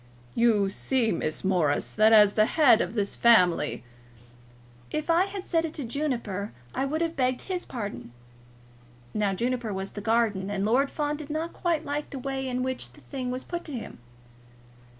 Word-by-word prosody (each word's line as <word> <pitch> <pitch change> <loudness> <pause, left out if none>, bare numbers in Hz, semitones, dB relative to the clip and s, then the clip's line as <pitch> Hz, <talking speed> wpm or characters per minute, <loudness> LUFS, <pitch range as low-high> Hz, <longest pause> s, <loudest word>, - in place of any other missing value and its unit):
"You 215 -4 +3
see, 240 +1 0
Miss 155 -2 -3
Morris, 175 -7 +1
that 215 +1 +5
as 210 -2 +7
the 215 0 +4
head 275 -8 +5
of 190 - -3
this 200 -2 0
family 185 - +4 0.5
" 120 0 -26 0.3
"If 305 +2 -1
I 345 +3 +4
had 390 -1 -6
said 330 -2 +1
it 325 -1 -4
to 295 - -3
Juniper, 235 -7 -3 0.2
I 270 - 0
would 310 +4 -2
have 335 0 -1
begged 255 -1 0
his 365 -2 -4
pardon." 205 - -6 1.0
Now 205 -2 0
Juniper 240 +1 -1
was 190 0 -4
the 205 - -7
gardener, 210 -3 +1
and 200 -1 -1
Lord 260 +6 +3
Fawn 295 -1 -2
did 300 -1 -9
not 315 +2 -3
quite 335 -3 -1
like 295 +1 -3
the 275 - -6
way 265 0 -3
in 250 0 -1
which 260 0 -3
the - - -17
thing 260 -3 -5
was 255 +1 -3
put 345 -1 -5
to 300 - -6
him. 235 - -7
245 Hz, 190 wpm, -27 LUFS, 205-295 Hz, 1.0 s, as